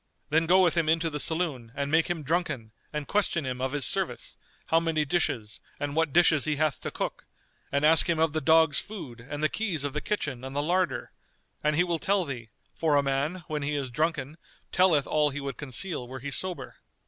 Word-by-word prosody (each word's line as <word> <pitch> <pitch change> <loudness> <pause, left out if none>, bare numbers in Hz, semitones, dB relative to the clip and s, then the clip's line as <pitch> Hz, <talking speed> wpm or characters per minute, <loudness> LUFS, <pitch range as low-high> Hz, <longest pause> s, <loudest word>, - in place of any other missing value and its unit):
[FN#236] - - -46
Then 160 +2 +3
go 185 +2 +6
with 170 -4 +3
him 160 -2 +2
into 165 +1 +2
the 150 - -3
saloon 150 -8 0
and 140 0 -2
make 160 +1 +3
him 170 -3 -2
drunken 150 -8 -1 0.2
and 150 -2 -4
question 195 -7 +1
him 125 -1 -4
of 130 0 -1
his 145 -3 -1
service, - - -1 0.3
how 165 - +3
many 160 -2 0
dishes 120 -10 -1 0.2
and 145 0 -3
what 160 -2 +2
dishes 160 -3 +4
he 155 -1 +1
hath 155 -1 0
to - - -3
cook, - - -5 0.4
and 140 +1 +2
ask 160 +2 +6
him 170 - +2
of 160 -1 +2
the 155 - -1
dogs' 160 0 +4
food 140 - -8
and 145 +1 -4
the - - +5
keys 180 -6 -2
of 145 -2 -2
the 150 - -2
kitchen 145 -12 -3
and 135 +1 -7
the 145 - 0
larder; 180 +3 0 0.5
and 150 0 +2
he 175 - +4
will 170 -2 -1
tell 195 0 +1
thee; 120 -6 -6 0.2
for 155 -3 +1
a 140 - +4
man, 140 +6 -1
when 150 -1 -3
he 145 +1 -1
is 135 -3 -3
drunken, 155 +1 -1 0.3
telleth 180 -6 +4
all 150 -1 +2
he 145 +1 -5
would 140 -2 -5
conceal 145 0 -2
were 130 +1 -7
he 140 +2 -6
sober. 185 +4 -2
150 Hz, 225 wpm, -28 LUFS, 140-165 Hz, 0.5 s, go